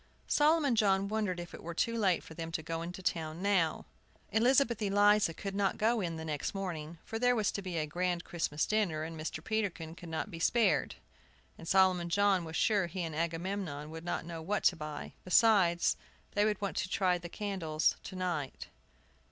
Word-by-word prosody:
Solomon 295 -3 +3
John 195 -2 +3
wondered 205 -4 -1
if 175 0 -8
it - - -9
were 170 0 -6
too 230 +6 0
late 195 -6 +2
for - - -11
them 165 0 -6
to 160 - -2
go 165 +1 -3
into 180 +3 -6
town 160 -2 -2
now. 185 -6 +1 0.5
Elizabeth 240 0 +3
Eliza 205 -1 +4
could 195 +4 -6
not 200 -1 0
go 225 +1 +2
in 170 -3 -2
the 160 0 -6
next 150 +4 -3
morning, 170 -4 -4
for 225 - -4
there 245 +1 +3
was 215 -3 +1
to 200 - -4
be 185 -3 -4
a 155 - 0
grand 175 +2 -1
Christmas 155 -3 -1
dinner, 195 -8 0
and 165 +1 -6
Mr. 155 0 -5
Peterkin 190 -7 -2
could 170 0 -10
not 160 +6 -3
be 165 - -7
spared, 230 +6 +2 0.6
and 165 - -11
Solomon 185 -2 +3
John 200 0 +3
was 160 0 -7
sure 205 -2 +2
he 180 +1 -4
and 160 -2 -4
Agamemnon 165 -2 -3
would 160 0 -7
not 175 - -3
know 165 -1 -6
what 200 +6 -1
to 180 - +4
buy. 150 -2 -6
Besides, 185 -3 +4 0.3
they 205 0 +2
would 210 -2 0
want 200 -2 -3
to 185 - -1
try 185 -2 +2
the 175 0 -8
candles 175 -7 0
to 190 - -7
night. 175 -7 -3
180 Hz, 200 wpm, -32 LUFS, 165-205 Hz, 0.6 s, Eliza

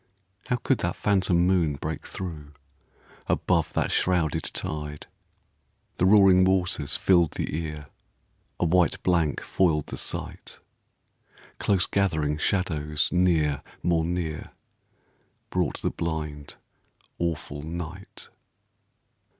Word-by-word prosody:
How 125 - +1
could 120 - 0
that - - -1
phantom 95 -3 +2
moon 90 -6 +2
break 80 +3 -5
through, 75 -6 -7 0.7
Above 85 -4 +1
that - - 0
shrouded 85 -5 +1
tide? 75 -1 -4 0.9
The 90 - +3
roaring 95 -2 +7
waters 90 -6 +1
filled 85 -4 +3
the - - -3
ear, 75 -2 -4 0.7
A - - +2
white 85 -1 +2
blank 85 -5 +1
foiled 80 -6 +1
the - - -7
sight. - - -4 1.0
Close 95 -3 +3
gathering 80 -7 0
shadows 75 -5 0
near, 80 -6 +2 0.2
more 85 -2 +2
near, 80 -2 -3 1.0
Brought - - -1
the - - +1
blind, 75 -3 -4 0.6
awful 80 -4 -3
night. 85 +4 -7
85 Hz, 105 wpm, -26 LUFS, 75-90 Hz, 1.0 s, roaring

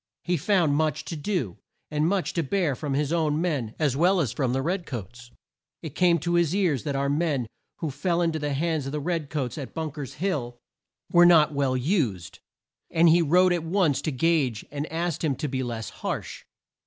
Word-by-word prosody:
He 180 - 0
found 170 -2 +2
much 155 +1 0
to 170 - -5
do, 150 - -2 0.3
and 150 +1 +1
much 195 -2 -1
to 170 - 0
bear 160 -1 0
from 140 0 -3
his 150 +2 0
own 155 -3 +1
men 145 -11 -2
as 145 -5 +1
well 180 +6 +3
as 135 -9 0
from 125 0 -1
the 135 +1 -1
red 180 +3 -2
coats. 120 - -7 0.5
It 155 -4 -6
came 175 -2 +3
to 170 +2 -1
his 170 0 +2
ears 170 -9 +1
that 140 -2 -2
our 140 0 0
men 145 -3 0 0.4
who 160 -3 -2
fell 170 +5 -1
in 165 - +1
to 160 - -3
the 145 -1 -2
hands 155 -1 -1
of 135 - -5
the 150 - -1
red 160 -1 -2
coats 145 -1 -3
at 135 -4 -8
Bunk 160 -2 -4
er's 135 -4 -6
Hill, 145 -9 -2 0.5
were 175 0 +7
not 155 -3 +5
well 135 -2 +1
used, 125 - -1 0.5
and 165 +1 +4
he 170 +2 +5
wrote 180 +3 +4
at 170 -2 -1
once 165 -5 +1
to 155 - -2
Gage 135 -5 +1
and 145 +2 -4
asked 170 0 -2
him 145 -4 +1
to 150 - -3
be 130 -1 -2
less 115 -3 -4
harsh. - - -5
155 Hz, 215 wpm, -26 LUFS, 135-170 Hz, 0.5 s, were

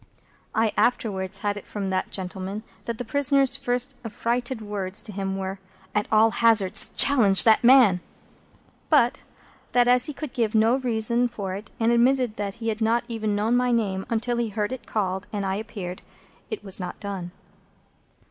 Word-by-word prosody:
I 220 -1 +1
afterwards 195 -5 -1
had 205 0 0
it 205 - -9
from 200 -2 -4
that 185 0 -2
gentleman, 190 +2 -5 0.2
that 235 -1 -4
the 245 - -5
prisoner's 275 +1 +3
first 250 0 0
affrighted 235 +2 -3
words 205 -2 -4
to 215 - -7
him 195 -1 -3
were, 190 0 -5 0.3
"At 210 0 0
all 220 +1 +5
hazards, 220 -4 +4
challenge 210 -9 +6
that 220 0 +4
man!" 240 -7 +6 0.9
But 285 -3 +3 0.5
that, 245 -1 +4
as 250 +3 +4
he 300 - -6
would 305 -5 -6
give 230 -4 -1
no 225 +3 +4
reason 235 -1 0
for 200 -5 -6
it, 205 +3 -8
and 230 0 +2
admitted 245 -1 +2
that 200 -1 -4
he 230 -1 -4
had 220 0 -4
not 230 +2 +1
even 220 -3 -2
known 215 +4 +1
my 250 0 +2
name 195 -5 -1
until 235 +1 -1
he 235 -2 -1
heard 210 +1 -3
it 255 -4 -7
called 190 -2 -2
and 205 -2 -3
I 190 - -1
appeared, 200 -5 -7 0.5
it 435 - -6
was 195 -1 -4
not 180 - -6
done. 195 -4 -5
220 Hz, 175 wpm, -24 LUFS, 200-245 Hz, 0.9 s, challenge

